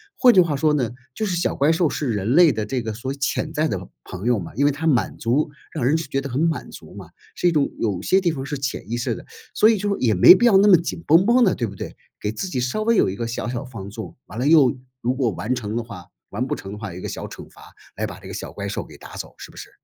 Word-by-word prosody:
换 250 -2 +6
句 190 - +6
话 165 -5 +3
说 150 +2 +2
呢， 130 -6 0 0.2
就 215 - -2
是 185 -4 -1
小 170 - 0
怪 140 +2 +2
兽 165 -1 +2
是 140 -4 -2
人 105 +5 0
类 170 -4 +7
的 110 -1 -2
这 125 +3 -2
个 110 -1 -4
所 130 +5 -4
潜 140 +2 -2
在 155 0 0
的 95 - -4 0.2
朋 95 +3 -7
友 120 -3 +3
嘛。 85 0 -8
因 140 - +1
为 145 - +4
它 155 +4 -3
满 130 -6 +1
足 140 +6 0 0.2
让 - - -3
人 145 +5 +3
觉 140 -4 -2
得 140 - -6
很 125 +2 -2
满 165 -1 -1
足 - - -12
嘛， - - -10 0.3
是 180 - +2
一 - - 0
种 150 -4 +1
有 100 -5 -1
些 190 - +3
地 175 -3 +1
方 135 -4 -5
是 145 0 -4
潜 135 -5 -4
意 120 - -1
识 120 0 -1
的， - - -9 0.3
所 215 - +5
以 225 - +3
就 205 0 -1
也 115 -4 +2
没 95 - +9
必 215 +6 +2
要 230 -5 +5
那 200 +2 +6
么 185 - +8
紧 170 0 -5
绷 165 +5 +5
绷 240 +3 +5
的， 190 - +4
对 120 - -2
不 100 - -9
对？ - - -8 0.2
给 105 - -1
自 110 - -4
己 130 -9 -2
稍 130 +13 -1
微 230 +1 +3
有 190 - +3
一 95 - -5
个 115 - -3
小 115 0 -4
小 125 +2 -4
放 105 -6 -8
纵， 110 +2 -8
完 110 - -7
了 130 - 0
又 140 -5 +5 0.2
如 125 +2 0
果 130 -3 0
完 105 +6 -2
成 110 -4 -4
的 120 - -1
话 100 -7 -10 0.2
完 120 +6 -3
不 - - -1
成 95 - -9
的 105 - -7
话， 105 -4 -6
有 - - -9
一 - - -8
个 - - -5
小 - - -6
惩 - - -11
罚 - - -18 0.4
来 - - -1
把 - - -9
这 - - -10
个 - - -7
小 - - -6
怪 - - -5
兽 - - -4
给 - - -14
打 - - -11
走， - - -7
是 - - -10
不 - - -18
是？ - - -9
135 Hz, 330 characters per minute, -22 LUFS, 115-165 Hz, 0.4 s, 没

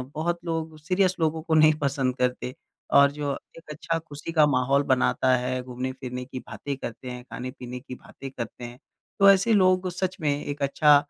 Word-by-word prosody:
बहुत 170 +2 -1
लोग 160 -1 -3
सीरियस 185 +3 +1
लोगों 160 0 0
को 160 -1 -1
नहीं 155 0 +6
पसंद 135 -2 0
करते। 125 0 -1 0.4
और 140 0 +7
जो 145 -1 -3 0.3
एक 165 -2 -15
अच्छा 165 +2 -2
ख़ुशी 155 0 -8
का 155 -2 +5
माहौल 135 +1 +2
बनाता 130 0 +3
है, 125 +1 -2
घूमने-फिरने 125 0 -5
की 130 0 -7
बातें 140 +2 -6
करते 125 0 -7
हैं, 125 0 -7
खाने-पीने 125 0 -7
की 130 0 -9
बातें 135 +2 -10
करते 120 -1 -7
हैं, 120 +1 -8 0.4
तो 200 - +8
ऐसे 195 +3 +5
लोगों 185 -2 +5
को 185 - -3
सच 185 +1 -3
में 150 -2 +2
एक 145 0 -5
अच्छा 145 +2 +5
140 Hz, 190 wpm, -26 LUFS, 130-165 Hz, 0.4 s, तो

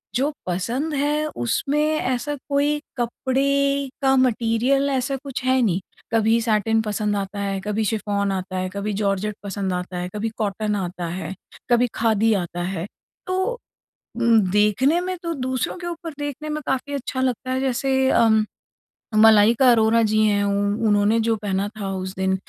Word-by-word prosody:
जो 280 +4 +1 0.2
पसंद 240 - -2
है 295 +2 0
उसमें 275 - 0 0.2
ऐसा 255 +3 -1
कोई 290 +1 +2 0.2
कपड़े 275 +3 0
का 270 -1 +4
मैटेरियल 255 +2 +2
ऐसा 270 0 0
कुछ 275 -3 -5
है 260 0 +3
नहीं, 190 -6 +2 0.3
कभी 225 +1 +3
सैटिन 225 0 +2
पसंद 210 -1 -1
आता 200 0 -4
है 195 -1 -2
कभी 210 +2 -1
शिफॉन 205 -2 -1
आता 185 0 -3
है, 185 0 -2
कभी 200 +1 -3
जॉर्जेट 200 +1 -1
पसंद 195 -1 -3
आता 180 0 -4
है, 180 0 -3
कभी 220 +2 -1
कॉटन 210 0 -1
आता 180 -2 -4
है, 175 +1 -5 0.4
कभी 240 +1 +4
खादी 225 0 +2
आता 175 -3 -2
है। 180 -1 -3 0.4
तो 375 +7 -1 0.6
उम, 235 -2 +4
देखने 210 - +3
में 370 +1 -3
तो 335 -1 -2
दूसरों 260 -2 -2
के 350 - -7
ऊपर 335 -1 -5
देखने 290 +1 -5
में 305 0 -3
काफ़ी 265 +2 -2
अच्छा 260 -1 -3
लगता 255 0 -1
है, 260 0 0
जैसे 265 0 +1
अम 220 -1 +4 0.7
मलाइका 220 +3 +6
अरोरा 225 0 +4
जी 215 0 +2
हैं 205 -1 +2
उ 200 +1 0
उन्होंने 205 +2 +3
जो 225 0 +1
पहना 200 -1 -2
था 195 -2 -3
उस 185 0 -4
दिन 190 0 +1
225 Hz, 165 wpm, -22 LUFS, 200-265 Hz, 0.7 s, मलाइका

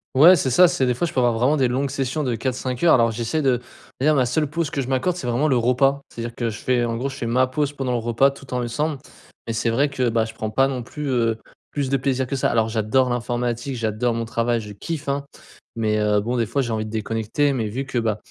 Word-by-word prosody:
Ouais, 170 +7 +8
c'est 135 -4 0
ça. 180 +9 +6
C'est 130 -5 0
des 125 - +1
fois 175 - 0
je 165 - -5
peux 130 - +1
avoir 120 -2 +3
vraiment 130 +6 +2
des 130 -4 +2
longues 135 +2 -1
sessions 140 +2 -2
de 125 -3 -1
4-5 125 +1 -3
heures. 165 - +7
Alors 115 -2 +3
j'essaie 120 +7 -2
de 125 -2 +2 0.4
d'ailleurs 150 +3 +3
ma 130 -2 +3
seule 150 +5 0
pause 165 -1 -2
que 140 - -1
je 125 - -5
m'accorde 135 +7 0
c'est 135 -9 -5
vraiment 125 +6 +1
le 135 - +2
repas. 135 +4 +2
C'est-à-dire 115 0 -6
que 120 -1 -2
je 110 - -6
fais 125 -2 +1
en 115 -1 -1
gros, 135 +3 -2
je 135 - -8
fais 120 -4 -4
ma 130 +2 +3
pause 145 +2 -2
pendant 135 -3 -3
le 120 - 0
repas 120 +4 +2
tout 135 -1 -14
en - - 0
lessemble. 140 +5 -2 0.5
Mais 115 - -3
c'est 115 +1 0
vrai 135 +6 +2
que, 125 -3 0
ben, 115 -1 +1
je 115 - -9
prends 110 -1 -4
pas 135 +4 +3
non 130 -2 -3
plus, 145 +4 -6
heu, 115 -3 +1 0.3
plus 140 -3 -2
de 135 - +3
plaisir 130 0 0
que 140 - -3
ça. 135 - +1
Alors 115 -1 +1
j'adore 115 +4 +1
l'informatique, 120 +1 -2
j'adore 115 +1 -1
mon 115 0 -2
travail, 115 0 0
je 105 -1 -9
kiffe, 155 - -5
hein. 140 0 -1 0.5
Mais, 110 -2 0
heu, 105 -1 +2
bon 120 +3 -2
des 115 -3 0
fois 135 +4 0
j'ai 120 - -3
envie 110 -1 -1
de - - -8
déconnecter 115 +6 -1
mais 115 -4 -1
vu 130 +6 -4
que, 125 -2 -2
ben, 110 -2 0
125 Hz, 275 wpm, -22 LUFS, 115-140 Hz, 0.5 s, Ouais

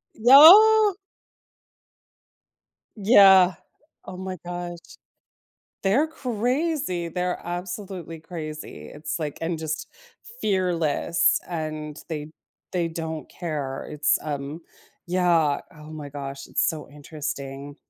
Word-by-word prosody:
No. 380 - +8 2.0
Yeah. 195 -3 +6 0.5
Oh 185 - -8
my 185 -1 -6
gosh. 175 0 -5 1.0
They're 245 +11 +2
crazy, 250 - -2
they're 180 +2 -2
absolutely 175 -1 -6
crazy, 155 - -8
it's, 150 +3 -5
like 150 -3 -5
and 165 0 -2
just 155 0 -4 0.5
fearless, 175 -4 +1
and 155 -3 -5
they 155 -1 -5 0.4
they 175 -2 0
don't 160 -1 -5
care. 145 -6 -5
It's, 150 0 +1
um 145 +2 -5 0.5
Yeah. 170 -5 +2
Oh 150 0 -13
my 150 -2 -8
gosh. 140 -1 -7
It's - - +1
so 155 -2 -4
interesting. 145 -1 -7
170 Hz, 95 wpm, -24 LUFS, 150-190 Hz, 2.0 s, No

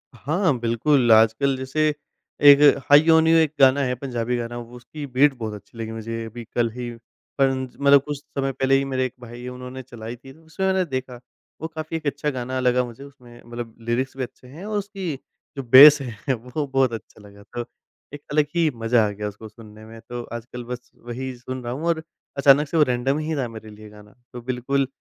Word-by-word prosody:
हाँ, 160 - 0
बिल्कुल। 120 +2 +2
आजकल 110 +5 +4
जैसे 130 +4 0 0.6
एक 140 0 +9 0.3
हाई 145 +3 +7
ऑन 160 0 +5
यू 165 - +5
एक 155 -2 +2
गाना 135 +1 +5
है, 125 -1 -1
पंजाबी 125 -2 -3
गाना। 120 0 -5
उसकी 125 +5 -9
बीट 135 +2 +3
बहुत 110 -2 -5
अच्छी 105 +3 -13
लगी 110 -1 -5
मुझे। 115 +1 -5
अभी 115 +1 -8
कल 120 -1 +2
ही 120 0 -6 0.5
परन 135 -1 +2 0.2
मतलब 140 -1 +6
कुछ 145 -1 -4
समय 135 -1 -3
पहले 135 +1 +1
ही 135 - -1
मेरे 130 -1 -1
एक 125 - -5
भाई 120 0 -10
है 125 - -6
उन्होंने 125 +1 -8
चलाई 120 -1 -8
थी 135 +2 -14
ना 160 - -21
उसमें 160 +5 -4
मैंने 190 -1 +2
देखा 130 -4 -5 0.4
वो 160 - -3
काफ़ी 160 0 -5
एक 155 - -11
अच्छा 145 +2 -1
गाना 130 -1 -3
लगा 125 0 +2
मुझे। 120 +3 -11
उसमें 125 -4 -15
मतलब 120 -1 -8
लीरिक्स 130 +3 -1
भी 130 - -2
अच्छे 125 +1 -11
हैं 160 +10 -10
और 210 -1 -2
उसकी 195 -6 -4 0.4
जो 135 - -3
बेस 140 +4 +9
है 125 +1 -3
वो 125 +5 -4
बहुत 135 -3 +1
अच्छा 110 -1 -9
लगा। 100 0 -16
तो 120 -1 -4 0.5
एक 145 - -8
अलग 150 0 +3
ही 165 -2 +3
मज़ा 115 -1 +2
आ - - -2
गया 105 +1 -5
उसको 110 +2 -9
सुनने 110 0 -14
में। 115 +1 -12
तो 120 -1 -5
आजकल 120 +1 -7
बस 125 +1 -8
वही 130 +2 -5
सुन 130 +1 -7
रहा 120 +1 -4
हूँ 150 +5 -5
और 160 -1 0 0.3
अचानक 140 +1 +5
से 165 - -2
वो 150 - +6
रैंडम 130 +2 0
ही 155 +1 -2
था 135 -4 -1
मेरे 110 -1 -10
लिए 105 0 -13
गाना। 105 +1 -16 0.2
तो 120 - -7
बिल्कुल 130 +2 -1
130 Hz, 215 wpm, -23 LUFS, 120-140 Hz, 0.6 s, एक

